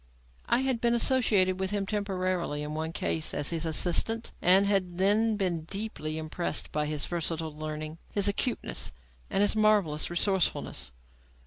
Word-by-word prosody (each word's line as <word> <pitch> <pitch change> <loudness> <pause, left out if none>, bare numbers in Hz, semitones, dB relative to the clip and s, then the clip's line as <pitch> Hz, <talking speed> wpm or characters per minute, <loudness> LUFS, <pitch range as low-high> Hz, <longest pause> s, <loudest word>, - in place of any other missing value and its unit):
I 250 - +3
had 260 -3 0
been 235 0 +2
associated 210 -7 +3
with 190 0 -1
him 205 -1 -1
temporarily 185 -7 -2
in 150 +1 -5
one 160 +1 -3
case 160 -1 -1
as 145 - 0
his 165 -1 -1
assistant, 190 +8 +2
and 190 +3 +5
had 190 -3 0
then 210 +4 +3
been 175 -5 -1
deeply 180 -6 -4
impressed 160 +2 -3
by 150 0 -1
his 150 -1 -1
versatile 165 -2 -3
learning, 155 +1 -6
his 200 -1 +1
acuteness 215 +4 -1 0.4
and 195 - +1
his 205 +1 +4
marvellous 210 -8 +2
resourcefulness. 185 +1 0
185 Hz, 150 wpm, -28 LUFS, 160-205 Hz, 0.4 s, and